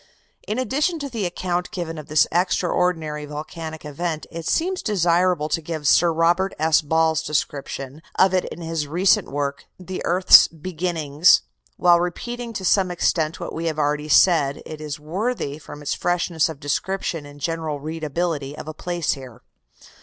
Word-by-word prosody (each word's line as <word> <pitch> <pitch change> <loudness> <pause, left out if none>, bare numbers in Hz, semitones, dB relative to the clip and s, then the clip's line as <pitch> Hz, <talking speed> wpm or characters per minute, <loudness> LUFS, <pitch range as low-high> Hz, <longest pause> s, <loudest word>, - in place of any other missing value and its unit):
In 215 - -2
addition 295 +7 0
to 285 -2 -5
the 225 -7 -2
account 180 0 -2
given 165 -3 -5
of 150 - -10
this 155 -2 +4
extraordinary 175 -3 0
volcanic 155 +1 -7
event, 155 +2 -3
it 165 -1 -6
seems 370 +3 0
desirable 175 -5 +2
to 160 +2 0
give 155 -2 -4
Sir 170 +3 +5
Robert 170 +4 +2
S. 160 0 +3
Ball's 160 +1 +2
description 145 -1 -3 0.2
of 190 0 +4
it 185 - +2
in - - -8
his 165 -2 -3
recent 185 +5 +2
work, 140 0 -3
"The 185 0 -6
Earth's 180 +2 +7
Beginnings." 165 -2 +2 0.3
While 175 -1 +5
repeating 235 +7 -4
to 190 - -4
some 190 0 +3
extent 165 -2 0
what - - -6
we 165 +1 -3
have 155 -2 -2
already 150 0 0
said, 145 -3 +4
it 155 -1 -8
is 150 -1 -5
worthy, 165 - -3
from 145 0 -11
its 145 - -1
freshness 170 -2 0
of 155 -4 -8
description 160 +1 -2
and 145 0 -13
general 160 -1 -3
readability, 155 -1 -3
of - - -8
a 155 - -5
place 175 0 -2
here. 125 -3 -8
165 Hz, 165 wpm, -22 LUFS, 150-180 Hz, 0.3 s, Earth's